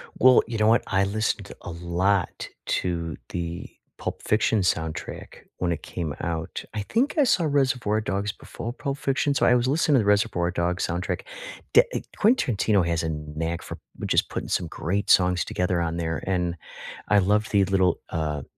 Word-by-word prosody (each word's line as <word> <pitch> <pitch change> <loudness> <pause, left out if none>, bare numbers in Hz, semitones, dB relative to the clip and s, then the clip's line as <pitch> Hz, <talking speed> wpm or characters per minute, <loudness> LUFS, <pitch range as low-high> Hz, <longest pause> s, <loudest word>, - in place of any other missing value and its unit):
Well, 130 0 +6
you 115 -2 -3
know 105 0 +3
what? 115 +2 +4
I 95 0 +2
listened 110 +2 -2
a 85 - -7
lot 90 +3 0 0.2
to 85 -3 -1
the 85 0 -4 0.3
Pulp - - -5
Fiction 110 0 +2
soundtrack 80 -3 -3 0.2
when 90 -1 0
it 80 - -3
came 80 -5 -4
out. 80 -1 -3
I 105 - -2
think 240 - 0
I 295 - +6
saw 180 -9 +3
Reservoir 130 -7 +1
Dogs 100 0 -2
before 115 - -7
Pulp 140 -1 -4
Fiction, 140 +1 0
so - - +2
I 125 - +5
was 125 +1 +2
listening 150 0 +3
to - - +5
the 105 - 0
Reservoir 100 -4 +2
Dogs 90 0 0
soundtrack. 90 +2 -2 0.5
D 470 - +9
eh - - -1 0.2
Quentin 215 - +3
Tarantino 100 -3 +2
has 85 -1 0
a 80 - -1
knack 80 +2 -4
for - - -8 0.2
which - - -2
is - - +5
putting - - -6
some 85 - 0
great 95 +6 -2
songs 90 -2 +4
together 90 -1 -1
on 85 0 -2
there, 80 -1 -2
and 90 -2 0 0.5
I 105 - +5
love 105 +3 +2
the 100 -2 +3
little, 95 -2 +2
uh 75 -3 -2
95 Hz, 185 wpm, -25 LUFS, 85-110 Hz, 0.5 s, D